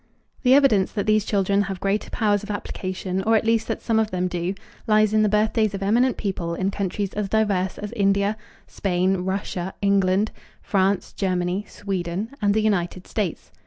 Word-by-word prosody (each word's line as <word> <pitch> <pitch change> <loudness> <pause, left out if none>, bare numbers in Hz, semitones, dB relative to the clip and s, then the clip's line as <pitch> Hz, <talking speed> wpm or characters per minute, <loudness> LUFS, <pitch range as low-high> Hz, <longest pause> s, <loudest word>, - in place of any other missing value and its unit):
The 255 0 +5
evidence 260 -9 +4
that 205 - -1
these 215 -1 +3
children 200 -1 +2
have 195 -2 -3
greater 200 +2 -1
powers 205 -3 +1
of 210 - -10
application, 185 -2 -3
or 225 +3 +3
at 220 - +2
least 225 0 +2
that - - -3
some 225 -1 +2
of 220 -1 +1
them 185 -1 -1
do, 180 +1 -2 0.3
lies 215 -1 +4
in 215 - +4
the 215 - +3
birthdays 215 0 +1
of 195 - -4
eminent 240 +5 +2
people 175 -5 -3
in 190 +2 -1
countries 200 0 -3
as 205 -1 -2
diverse 200 -4 +1
as 210 0 -6
India, 200 -1 +1 0.3
Spain, 190 0 0
Russia, 190 0 -3
England, 200 +1 +2 0.3
France, 195 -1 +1
Germany, 185 +1 -1
Sweden, 195 +2 -3
and 205 0 +2
the 220 - +3
United 185 -3 0
States. 200 -7 -3
200 Hz, 180 wpm, -23 LUFS, 185-215 Hz, 0.3 s, The